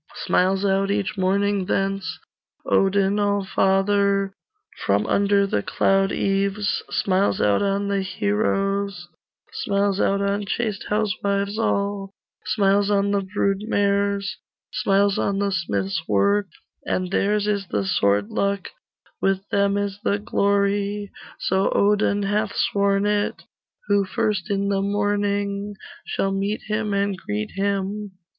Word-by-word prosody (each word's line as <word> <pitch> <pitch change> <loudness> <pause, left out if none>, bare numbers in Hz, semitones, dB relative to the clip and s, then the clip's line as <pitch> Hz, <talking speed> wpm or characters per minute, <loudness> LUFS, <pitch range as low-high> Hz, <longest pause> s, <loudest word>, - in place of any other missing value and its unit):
Smiles 190 +2 +1
out 195 0 +1
each 200 -1 -1
morning 200 +1 +1
thence 195 0 -1 0.5
Odin 195 +1 +2
Allfather; 200 0 +1 0.5
From - - +2
under 200 0 +3
the 145 - 0
cloud 195 - +2
eaves, 200 +1 0
Smiles 190 +1 +1
out 105 -1 +3
on 200 0 0
the 200 -1 0
heroes, 200 -1 -1 0.5
Smiles 200 -1 0
out 200 - +2
on 200 +1 -1
chaste 215 -2 -2
housewives 200 0 -1
all, 200 -2 -1 0.4
Smiles 200 -1 +2
on 200 0 +2
the 200 -1 +1
brood 195 0 -1
mares, 200 -1 0 0.4
Smiles 200 0 +2
on 200 - 0
the 200 0 0
smith's 100 - -1
work: 200 - +2 0.4
And 185 0 -2
theirs 205 +1 +1
is 200 -2 -1
the 100 -10 -1
sword 100 +1 +1
luck, 200 -1 -1 0.5
With 195 +1 0
them 200 0 +2
is 200 0 -2
the 200 - +1
glory 200 0 0 0.3
So 190 +1 +1
Odin 205 0 +2
hath 205 +1 -1
sworn 200 0 +1
it 205 0 0 0.4
Who 205 -1 +2
first 210 -1 -1
in 200 0 0
the 195 -1 +1
morning 205 0 -1 0.3
Shall 195 - -1
meet 200 +2 -1
him 215 0 -2
and 200 0 0
greet 105 - -4
him. 200 +1 -2
200 Hz, 125 wpm, -23 LUFS, 195-205 Hz, 0.5 s, under